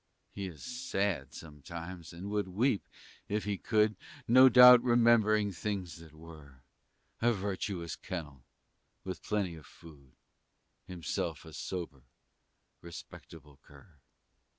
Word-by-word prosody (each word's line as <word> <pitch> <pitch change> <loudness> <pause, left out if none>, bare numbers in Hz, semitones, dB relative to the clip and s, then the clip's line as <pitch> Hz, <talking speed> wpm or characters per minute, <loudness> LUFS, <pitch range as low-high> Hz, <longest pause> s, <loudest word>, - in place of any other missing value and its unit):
He 100 -1 -5
is 80 -5 -11
sad 100 - -2
sometimes, 85 +3 -9
and 90 +4 -8
would 105 -2 -1
weep, 105 +4 0 0.4
if 105 +1 -1
he 105 0 -2
could, 110 -1 +2 0.3
No 130 +3 +8
doubt 125 0 +9
remembering 115 -4 +3
things 95 -1 -4
that 80 -2 -15
were, 75 -5 -14 0.6
A 120 +1 +4
virtuous 95 -3 -4
kennel, 75 -8 -7 0.6
with 95 -2 -6
plenty 100 -5 -2
of 80 -3 -13
food, 70 -6 -16 0.7
And - - -8
himself 85 -1 -4
a 80 - -12
sober, 85 -5 -6 0.8
respectable 75 -3 -12
cur. 75 +2 -19
90 Hz, 120 wpm, -31 LUFS, 80-105 Hz, 0.8 s, doubt